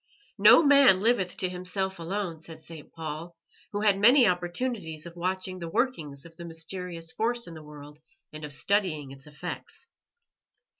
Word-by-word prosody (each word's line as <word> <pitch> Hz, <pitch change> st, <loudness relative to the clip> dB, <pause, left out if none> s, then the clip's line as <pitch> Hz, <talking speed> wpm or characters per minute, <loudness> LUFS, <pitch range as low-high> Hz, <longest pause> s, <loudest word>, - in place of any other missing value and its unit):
"No -, -, +8 dB
man 280 Hz, -9 st, +7 dB
liveth 200 Hz, -4 st, +1 dB
to 185 Hz, -, 0 dB
himself 185 Hz, +1 st, -3 dB
alone," 170 Hz, -1 st, -3 dB
said 160 Hz, 0 st, -11 dB
St. 160 Hz, -3 st, -11 dB
Paul, 160 Hz, +1 st, -7 dB, 0.3 s
who 205 Hz, -, -2 dB
had 205 Hz, -2 st, +3 dB
many 245 Hz, +5 st, +7 dB
opportunities 175 Hz, -2 st, -2 dB
of 170 Hz, 0 st, -10 dB
watching 185 Hz, +1 st, -3 dB
the 170 Hz, -1 st, -5 dB
workings 160 Hz, -, -2 dB
of 165 Hz, 0 st, -14 dB
that 170 Hz, -, -8 dB
mysterious 165 Hz, 0 st, -5 dB
force 235 Hz, +2 st, -1 dB
in 170 Hz, -, -9 dB
the 160 Hz, -, -9 dB
world 150 Hz, 0 st, -12 dB, 0.3 s
and 155 Hz, 0 st, -8 dB
of 150 Hz, -, -6 dB
studying 155 Hz, -4 st, 0 dB
its 135 Hz, +1 st, -13 dB
effects. 150 Hz, -, -8 dB
175 Hz, 160 wpm, -28 LUFS, 160-200 Hz, 0.3 s, No